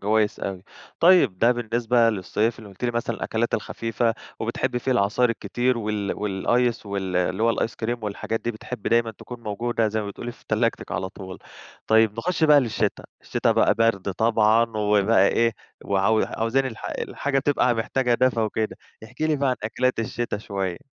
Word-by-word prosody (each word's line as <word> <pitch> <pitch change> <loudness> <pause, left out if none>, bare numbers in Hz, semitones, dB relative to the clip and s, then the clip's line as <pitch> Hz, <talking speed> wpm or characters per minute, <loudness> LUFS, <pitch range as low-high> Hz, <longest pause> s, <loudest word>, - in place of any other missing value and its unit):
كويس 105 +1 +1
أوي. 95 -2 -4 0.4
طيب 165 - +5
ده 120 +4 +5
بالنسبة 120 0 +2
للصيف 110 +3 -1
اللي 110 - -11
قُلتِ 100 +5 -8
لي 120 - +2
مثلًا 120 -1 -2
الأكلات 115 +1 -1
الخفيفة 115 0 -1 0.3
وبتحبّي 125 - -1
فيه 130 +2 0
العصاير 120 +2 +2
الكتير 120 +3 -1
وال 105 -2 -2
والice 115 +4 0
وال 95 -2 -3
اللي 90 +3 0
هو 115 0 +2
الice - - 0
cream 120 +2 0
والحاجات 105 +2 -3
دي، 120 - -2
بتحب 110 -2 -8
دايمًا 115 -1 +2
تكون 120 +2 -10
موجودة 115 +1 -1
زي 110 +1 -1
ما 105 - -5
بتقولي 120 +4 -6
في - - -23
تلاجتِك 115 +2 -1
على 95 - -2
طول. 95 -1 -9 0.5
طيب 110 -1 +4
نخش 170 +6 0
بقى 150 -2 +7
للشِتا، 115 -5 -1 0.2
الشِتا - - +1
بقى - - +3
بَرْد 115 -4 +1
طبعًا 110 +2 +3
وبقى 105 -1 +3
إيه، 115 0 +2 0.3
وعاو 100 +3 +2
عاوزين 120 +4 0
الح 115 -4 -7
الحاجة 140 -1 -1
تبقى 135 -3 +2
محتاجة 120 +2 0
دفى 125 -1 +2
وكده. 110 0 -1 0.3
احكِ 120 +5 -16
لي 155 -1 +2
بقى 140 -1 +1
عن 125 - -1
أكلات 125 +4 0
الشِتا 115 -1 -2
شوية. 95 -4 -3
115 Hz, 175 wpm, -24 LUFS, 105-120 Hz, 0.5 s, بقى